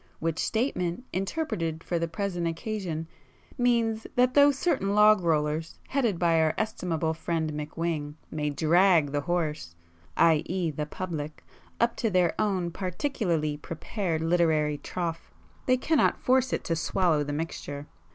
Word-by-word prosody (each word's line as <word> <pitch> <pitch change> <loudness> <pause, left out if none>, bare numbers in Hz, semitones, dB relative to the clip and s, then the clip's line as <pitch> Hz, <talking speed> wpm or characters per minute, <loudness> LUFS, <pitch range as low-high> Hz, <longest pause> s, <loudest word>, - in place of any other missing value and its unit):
Which 165 0 -2
statement, 220 -5 -1
interpreted 185 - -2
for 170 - -1
the 170 - -1
present 175 -2 -2
occasion, 165 -2 -3 0.5
means 230 -3 +1
that 250 +1 +3
though 285 +1 +7
certain 265 - 0
log 210 -1 +6
rollers, 155 -1 0
headed 240 -9 +1
by 165 -2 +3
our 155 -1 +2
estimable 170 -7 -1
friend 160 -1 -2
McWhing, 150 0 -3 0.2
may 150 -1 -1
drag 160 +1 +4
the 145 0 0
horse—i.e. 150 - -1
the 150 +1 -3
public, 155 -4 -5 0.3
up 235 0 +2
to 225 - +1
their 180 -3 +2
own 185 -5 0
particularly 180 - -1
prepared 165 +2 -3
literary 160 -3 +2
trough, 170 -2 -4 0.4
they 255 0 +4
cannot 305 +4 +2
force 260 0 +2
it - - -1
to 165 - -1
swallow 160 -1 +1
the 145 - -4
mixture. 145 -2 -4
170 Hz, 135 wpm, -27 LUFS, 155-205 Hz, 0.5 s, though